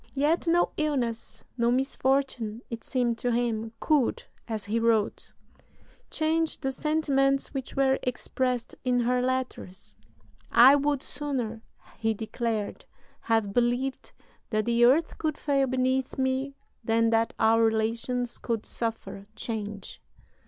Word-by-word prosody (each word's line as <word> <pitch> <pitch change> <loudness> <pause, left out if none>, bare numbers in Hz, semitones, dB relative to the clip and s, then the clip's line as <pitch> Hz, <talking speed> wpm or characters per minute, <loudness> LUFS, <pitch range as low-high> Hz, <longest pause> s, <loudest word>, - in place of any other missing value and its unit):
Yet 305 +5 +1
no 345 +1 +3
illness, 255 -7 -2
no 235 -1 +2
misfortune, 260 -3 0
it 230 -1 -5
seemed 240 -3 0
to 245 - 0
him, 230 -2 -1
could, 295 -6 +1 0.2
as 220 -4 -4
he 220 +3 0
wrote, 225 -2 0 0.8
"change 320 0 0
the 270 -3 -1
sentiments 275 -2 +1
which 270 -2 -5
were 270 -1 +3
expressed 250 -1 -2
in 250 -1 +2
[her] 250 +1 +1
letters."... 255 -7 -4 0.5
"I 260 +4 +8
would 285 -1 0
sooner," 250 -7 -3 0.4
he 225 -1 0
declared, 220 -1 -3 0.3
"have 225 -3 0
believed 245 +3 0 0.4
that 215 -2 0
the 235 0 +4
earth 295 +7 +3
could 310 -2 -1
fail 275 -2 +1
beneath 260 0 0
me 265 +1 -1 0.3
than 225 0 +2
that 225 0 +1
our 225 +1 +4
relations 230 +2 0
could 230 -3 -2
suffer 225 -3 -4
change. 210 -3 -5
245 Hz, 125 wpm, -27 LUFS, 225-270 Hz, 0.8 s, I